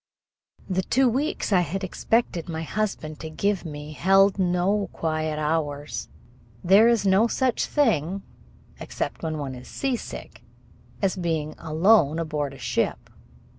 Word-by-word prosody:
The 185 -1 0
two 260 +7 +2
weeks 265 -2 -1
I 185 - +6
had 180 +3 -2
expected 190 -2 0
my 160 0 -3
husband 165 -5 -3
to 160 - -6
give 200 +4 -1
me 150 -1 -7
held 195 +4 +4
no 185 +2 +1
quiet 155 -1 -2
hours. 150 -1 -2 0.5
There 200 +5 +6
is 235 -4 +3
no 195 +4 +4
such 255 0 0
thing, 195 - +1 0.6
except - - -4
when 160 -1 -3
one 140 -3 -4
is 125 0 -10
seasick, 265 -4 -4 0.6
as 195 - +2
being 160 -4 -2
alone 160 0 +3
aboard 150 -4 -2
a - - -12
ship. - - -2
175 Hz, 135 wpm, -25 LUFS, 155-205 Hz, 0.6 s, I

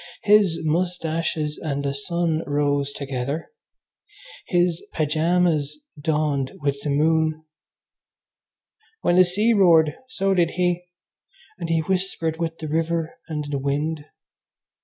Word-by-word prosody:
His 200 -5 +4
moustaches 160 -2 -1
and 140 -2 -3
the 140 - 0
sun 165 +2 -1
rose 145 -1 0
together. 140 - -4 1.0
His 175 -2 +1
pyjamas 160 - +1 0.2
dawned 150 -3 0
with 140 -1 -1
the 150 - -3
moon. 155 +2 +1 1.6
When 175 - +2
the 185 - +8
sea 205 +6 +2
roared 165 -7 +5
so 195 -6 0
did 175 -3 +3
he, 180 -1 +1 0.7
and 170 -2 -4
he 165 -1 +2
whispered 180 -2 -1
with 165 -1 -2
the 155 - -6
river 165 +1 -1
and 150 -3 -3
the 140 - -1
wind. 145 +2 -2
160 Hz, 115 wpm, -23 LUFS, 150-175 Hz, 1.6 s, the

